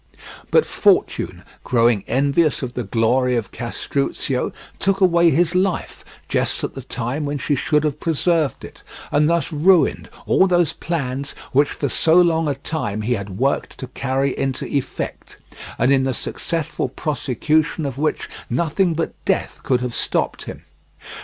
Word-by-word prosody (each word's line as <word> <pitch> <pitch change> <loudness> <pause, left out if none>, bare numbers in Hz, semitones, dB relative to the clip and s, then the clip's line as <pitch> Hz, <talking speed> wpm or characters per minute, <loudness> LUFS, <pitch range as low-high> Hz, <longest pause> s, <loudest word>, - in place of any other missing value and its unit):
But - - +4
Fortune - - +1 0.2
growing 115 -4 +2
envious 140 +3 +2
of 125 -1 -4
the 125 - -3
glory 125 +4 +1
of 115 -5 -2
Castruccio 125 +2 -2 0.3
took 195 0 +1
away 170 -3 +5
his 165 +3 +2
life 185 -1 -1 0.2
just - - 0
at - - -3
the 135 - -7
time 125 +3 -3
when 145 0 -2
she 145 - -1
should 150 +2 +1
have 150 -1 -1
preserved 165 -2 0
it, - - -13 0.3
and 150 +2 +3
thus 170 +1 0
ruined 170 +3 +3 0.2
all 190 - +4
those 175 -4 +2
plans 140 -4 -3 0.2
which 145 +2 +3
for 140 - -2
so 160 +6 +2
long 165 -3 +4
a 145 - 0
time 130 -7 -3
he 120 +3 +1
had 100 -4 -5
worked 135 +4 -1
to 130 - -6
carry 135 +1 -1
into 135 -1 -2
effect, 140 -2 -4 0.4
and 135 - +3
in 135 - +4
the 130 -1 -1
successful 165 -2 -2
prosecution 150 +4 0
of 135 -1 -4
which 155 +1 -1 0.2
nothing 165 +6 +1
but 165 - -2
death - - -1
could 125 -2 +1
have 125 -1 -3
stopped - - -1
him. - - -8
140 Hz, 160 wpm, -21 LUFS, 125-165 Hz, 0.4 s, away